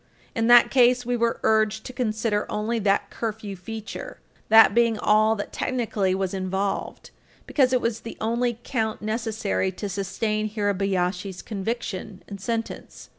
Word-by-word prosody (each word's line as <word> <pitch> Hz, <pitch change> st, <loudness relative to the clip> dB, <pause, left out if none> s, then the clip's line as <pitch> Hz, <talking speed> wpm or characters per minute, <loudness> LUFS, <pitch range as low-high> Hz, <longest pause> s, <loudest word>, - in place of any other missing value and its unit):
In 225 Hz, 0 st, 0 dB
that 240 Hz, 0 st, +7 dB
case, 250 Hz, -1 st, +4 dB
we 245 Hz, 0 st, 0 dB
were 235 Hz, -1 st, 0 dB
urged 220 Hz, 0 st, +2 dB
to 255 Hz, -, -7 dB
consider 220 Hz, -3 st, -1 dB
only 215 Hz, +2 st, -1 dB
the 200 Hz, -1 st, +2 dB
curfew 215 Hz, -3 st, -4 dB
feature, 220 Hz, +4 st, -7 dB, 0.3 s
that 220 Hz, -2 st, +8 dB
being 230 Hz, -1 st, +3 dB
all 215 Hz, +1 st, +3 dB
that 205 Hz, -, -6 dB
technically 215 Hz, -7 st, -1 dB
was 190 Hz, -1 st, -2 dB
involved, 190 Hz, +1 st, -3 dB, 0.3 s
because 260 Hz, -4 st, +2 dB
it 255 Hz, -1 st, +2 dB
was 230 Hz, -1 st, -1 dB
the 230 Hz, -, -9 dB
only 235 Hz, +1 st, 0 dB
count 220 Hz, -5 st, -2 dB
necessary 215 Hz, -3 st, -1 dB
to 205 Hz, -, -5 dB
sustain 210 Hz, +2 st, -2 dB
Hirabayashi's 195 Hz, -3 st, -1 dB
conviction 210 Hz, -2 st, -4 dB
and 200 Hz, -2 st, -8 dB
sentence. 230 Hz, +2 st, -5 dB
215 Hz, 145 wpm, -25 LUFS, 200-230 Hz, 0.3 s, that